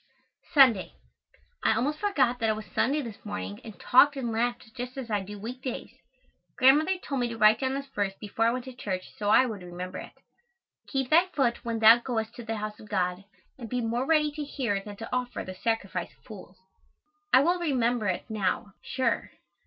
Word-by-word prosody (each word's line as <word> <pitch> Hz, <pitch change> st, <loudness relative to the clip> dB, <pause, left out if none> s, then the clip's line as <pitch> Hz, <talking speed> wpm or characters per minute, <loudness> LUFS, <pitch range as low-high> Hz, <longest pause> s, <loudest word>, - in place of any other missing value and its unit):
Sunday. 245 Hz, -9 st, +5 dB, 0.7 s
I -, -, +3 dB
almost 285 Hz, +7 st, -1 dB
forgot 275 Hz, -12 st, +1 dB
that 225 Hz, -2 st, +1 dB
it 215 Hz, -, +2 dB
was 215 Hz, 0 st, -7 dB
Sunday 270 Hz, +10 st, 0 dB
this 230 Hz, -4 st, -9 dB
morning 100 Hz, -, -5 dB
and 220 Hz, -, -11 dB
talked 285 Hz, +3 st, +5 dB
and 250 Hz, -4 st, -3 dB
laughed 235 Hz, 0 st, -2 dB
just 250 Hz, +1 st, -6 dB
as 245 Hz, -4 st, -5 dB
I 205 Hz, -1 st, +1 dB
do 205 Hz, +2 st, -8 dB
week 240 Hz, +5 st, -7 dB
days. 255 Hz, -2 st, -5 dB, 0.7 s
Grandmother 300 Hz, +8 st, +5 dB
told 275 Hz, -7 st, -3 dB
me 245 Hz, -, +1 dB
to 230 Hz, -1 st, -6 dB
write 215 Hz, 0 st, +6 dB
down 265 Hz, 0 st, -1 dB
this 275 Hz, 0 st, -4 dB
verse 205 Hz, -7 st, -2 dB
before 220 Hz, +2 st, 0 dB
I -, -, +3 dB
went 250 Hz, +1 st, -4 dB
to 260 Hz, -, -8 dB
church 190 Hz, -6 st, -5 dB
so 205 Hz, -1 st, 0 dB
I 255 Hz, +4 st, +6 dB
would 215 Hz, -6 st, -5 dB
remember 180 Hz, +1 st, -7 dB
it: -, -, -10 dB, 0.7 s
"Keep 265 Hz, -2 st, -2 dB
thy 340 Hz, +4 st, +6 dB
foot 260 Hz, -10 st, 0 dB
when 230 Hz, -1 st, -2 dB
thou 225 Hz, +1 st, +8 dB
goest 225 Hz, -2 st, -3 dB
to 240 Hz, -, -7 dB
the 225 Hz, 0 st, -3 dB
house 215 Hz, 0 st, -5 dB
of 215 Hz, -, -13 dB
God, 185 Hz, -1 st, -1 dB, 0.3 s
and 230 Hz, -3 st, -7 dB
be 250 Hz, -, -1 dB
more 240 Hz, +3 st, -1 dB
ready 305 Hz, -2 st, +3 dB
to 300 Hz, 0 st, -5 dB
hear 250 Hz, -8 st, -2 dB
than 205 Hz, 0 st, -8 dB
to 225 Hz, +4 st, -5 dB
offer 250 Hz, -1 st, -3 dB
the 185 Hz, -, -7 dB
sacrifice 195 Hz, -4 st, -2 dB
of -, -, -34 dB
fools." 195 Hz, -5 st, -12 dB, 0.7 s
I 255 Hz, -, +7 dB
will 350 Hz, +5 st, +2 dB
remember 245 Hz, -8 st, +1 dB
it 185 Hz, -, -1 dB
now, 200 Hz, -2 st, -2 dB
sure. 260 Hz, -2 st, -1 dB
235 Hz, 210 wpm, -28 LUFS, 210-265 Hz, 0.7 s, thou